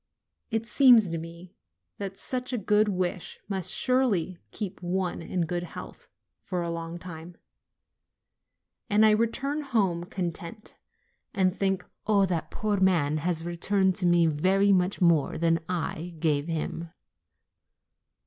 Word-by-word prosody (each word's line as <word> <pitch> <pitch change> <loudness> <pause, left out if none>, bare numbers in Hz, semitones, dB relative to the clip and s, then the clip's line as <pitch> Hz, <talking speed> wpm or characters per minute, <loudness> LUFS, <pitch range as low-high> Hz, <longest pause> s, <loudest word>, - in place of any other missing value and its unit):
It 225 -1 -1
seems 235 -5 +6
to 165 0 -3
me 170 +2 -10 0.4
that 195 -1 -5
such 255 0 -3
a 250 - -1
good 210 +1 +3
wish 180 -2 -3
must 190 -3 -2
surely 215 -10 +1
keep 200 -5 -5
one 180 0 -2
in 175 +2 -2
good 175 +1 -1
health 175 - -9 0.3
for 180 -4 -3
a 170 - -3
long 165 0 -5
time; 170 -1 -10 1.5
and 210 +1 +5
I 215 - +6
return 270 +7 0
home 200 - 0
content, 175 +3 -6 0.6
and 190 -1 +2
think, 195 -2 -1 0.2
"Oh, 200 -2 +4
that 175 -3 -2
poor 210 -2 -1
man 165 -6 +2
has 165 +1 0
returned 190 +2 +1
to 180 - +2
me 175 -1 +4
very 185 +6 +3
much 185 +1 +1
more 170 -5 +3
than 165 0 +2
I 175 -1 -3
gave 150 -2 +1
him 165 0 -3
185 Hz, 140 wpm, -27 LUFS, 170-205 Hz, 1.5 s, seems